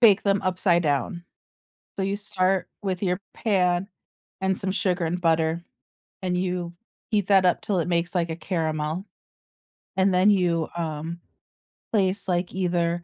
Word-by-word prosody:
bake 210 -5 +7
them 200 -1 +2
upside 180 -2 +2
down. 145 +4 -1 0.7
So 195 - -1
you 195 +1 0
start 190 -2 0
with 190 -2 -2
your 180 -1 0
pan, 185 -3 +1 0.5
and 190 -1 +1
some 190 - -1
sugar 185 -4 0
and 175 +2 -1
butter, 165 0 +1 0.6
and 180 -1 0
you 180 -1 -2 0.4
heat 205 -4 +1
that 195 -2 +5
up 180 - +3
'til 200 -3 0
it 170 - 0
makes, 170 +1 0
like, 170 -2 +1
a 160 - -3
caramel, 160 0 -2 0.9
and 190 0 +3
then 185 +3 +5
you, 175 -5 +2
um, 165 +1 -4 0.7
place, 200 -2 +1
like, 175 -1 0
either 175 -2 0
180 Hz, 150 wpm, -25 LUFS, 170-190 Hz, 0.9 s, bake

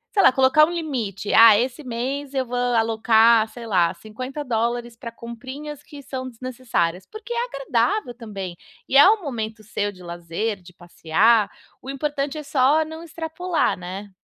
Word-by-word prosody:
sei 395 - +4
lá, - - +7
colocar 265 +4 +5
um 330 - -5
limite: 245 - -3
"Ah, 225 -2 +8
esse 255 +4 -3
mês 265 +3 -4
eu 265 -1 0
vou 245 0 -6
alocar, 225 -1 +3
sei 235 0 -10
lá, 180 -4 +2
$50 240 - -3
pra 230 0 -8
comprinhas 260 +6 -9
que 290 -1 -12
são 260 -1 -6
desnecessárias", 230 -8 -3
porque 435 +2 -7
é 475 0 0
agradável 275 - -1
também, 200 -6 -7 0.3
e - - -2
é 285 +7 +9
um 435 0 +2
momento 225 -7 -5
seu 205 -1 -2
de 185 -2 -16
lazer, 175 +4 -4
de 180 0 -16
passear. 190 +6 +2 0.3
O 265 - -10
importante 285 +1 -3
é 300 - -5
só 285 +3 +2
não 320 +1 -9
extrapolar, 335 +2 -2
né. 185 +3 -7
240 Hz, 165 wpm, -22 LUFS, 215-285 Hz, 0.3 s, é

